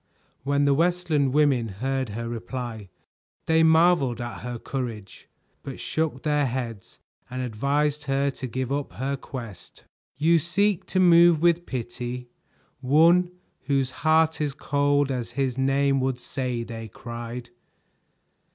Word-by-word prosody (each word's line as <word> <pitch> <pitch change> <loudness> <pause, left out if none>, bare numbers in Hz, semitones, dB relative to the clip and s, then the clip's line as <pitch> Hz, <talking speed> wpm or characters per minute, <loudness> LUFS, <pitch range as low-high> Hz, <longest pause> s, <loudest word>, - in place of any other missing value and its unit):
When 140 +2 +1
the 140 - +4
Westland 165 -3 +1
women 140 -5 +3
heard 130 +5 -2
her 115 +3 -5
reply, 120 -3 -6 0.6
they 160 0 +3
marveled 160 -6 +4
at 120 0 -5
her 125 -1 -5
courage, 115 -6 -6 0.3
but - - -8
shook 160 -1 -2
their 150 -2 +1
heads 120 -5 -5 0.3
and 130 0 -4
advised 145 +6 -1
her 140 0 +1
to 130 - -6
give 130 +2 -3
up 140 -7 -2
her 135 +8 -2
quest. 115 -9 -9 0.3
"You 165 +3 +4
seek 190 +4 0
to 185 - 0
move 170 -2 +6
with 170 +1 +2
pity 125 0 -5 0.5
one 165 +6 +4 0.4
whose 135 -1 +1
heart 160 0 +3
is 145 -2 -1
cold 145 -1 +1
as 120 -2 -4
his 135 -3 0
name 135 +1 +2
would 130 -1 -1
say!" 120 -1 -3
they 115 -1 -7
cried. 120 +2 -8
135 Hz, 135 wpm, -25 LUFS, 120-150 Hz, 0.6 s, move